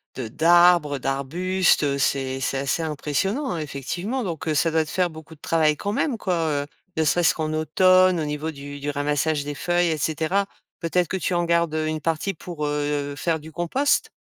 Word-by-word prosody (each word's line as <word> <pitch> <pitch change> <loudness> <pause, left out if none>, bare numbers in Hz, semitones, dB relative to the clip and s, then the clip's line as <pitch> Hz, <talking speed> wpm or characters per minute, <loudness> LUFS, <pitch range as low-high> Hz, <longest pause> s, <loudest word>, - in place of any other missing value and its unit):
de 125 -4 -4
d'arbres, 170 +2 +4
heu, - - -5
d'arbustes. 170 +8 +1
Heu, 140 -1 +1
c'est 135 -1 0
c'est 135 +1 -1
assez 140 +4 -1
impressionnant, 175 - -2
effectivement, 175 - -4
donc 165 -4 -5
heu, 155 - +1
ça 165 +3 +2
doit 160 0 +2
te 155 - -10
faire 180 -2 +1
beaucoup 160 0 -12
travail 155 0 +1
quand 205 - -3
même, 260 -2 0
quoi, 185 -3 -1 0.3
heu, 145 - -11 0.3
ne 160 - +3
serait-ce 170 +3 +3
qu'en 155 -1 -2
automne 185 +3 +4
au 155 - -1
niveau 150 +2 -3
du 145 -1 -9
du 145 +1 -3
ramassage 145 +1 0
des 145 0 -5
feuilles 175 +2 +1
et 160 - 0
cetera. 160 +6 0 0.3
Peut-être 175 +1 0
que 190 - -2
tu 185 - -2
en 175 0 +1
gardes, 170 -2 +1
heu, 155 0 0
une 155 0 -2
partie 165 +5 -1
pour, 165 -3 -6
heu, 145 -1 -1
faire 165 0 0
du 155 +1 -12
compost? 180 - 0
160 Hz, 200 wpm, -23 LUFS, 145-175 Hz, 0.3 s, d'arbres